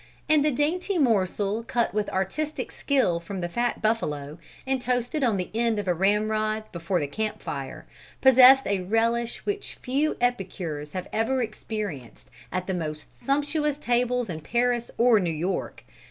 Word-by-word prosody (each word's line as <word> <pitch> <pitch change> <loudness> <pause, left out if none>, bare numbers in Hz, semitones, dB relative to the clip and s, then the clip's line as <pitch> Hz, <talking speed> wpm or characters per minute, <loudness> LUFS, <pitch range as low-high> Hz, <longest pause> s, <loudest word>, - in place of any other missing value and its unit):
And 305 -2 +4
the 305 - +3
dainty 330 +8 0
morsel 210 - +1
cut 240 -1 0
with 210 0 -1
artistic 290 - -2
skill 255 - +1
from 185 +3 -6
the 175 - -2
fat 240 +8 -2
buffalo, 150 -10 -1 0.3
and 265 -1 0
toasted 245 +4 -1
on 225 -5 +2
the 180 - -4
end 230 -1 +1
of 205 -2 -3
a 180 - +3
ramrod 215 +3 +1
before 170 +1 -1
the 145 - -1
camp 215 +9 -3
fire, 135 -2 -6 0.3
possessed 265 +1 +8
a 195 -2 0
relish 230 +4 0
which 410 0 -3
few 280 +4 0
epicures 180 -11 -2
have 185 -1 -4
ever 245 +4 +1
experienced 210 - -6 0.2
at 185 0 -2
the 190 - -2
most 155 -3 -5
sumptuous 290 +1 0
tables 245 -2 +1
in 160 -4 -5
Paris 240 +6 0
or 235 -2 +5
New 180 -3 0
York. 165 +4 -3
225 Hz, 160 wpm, -26 LUFS, 185-250 Hz, 0.3 s, possessed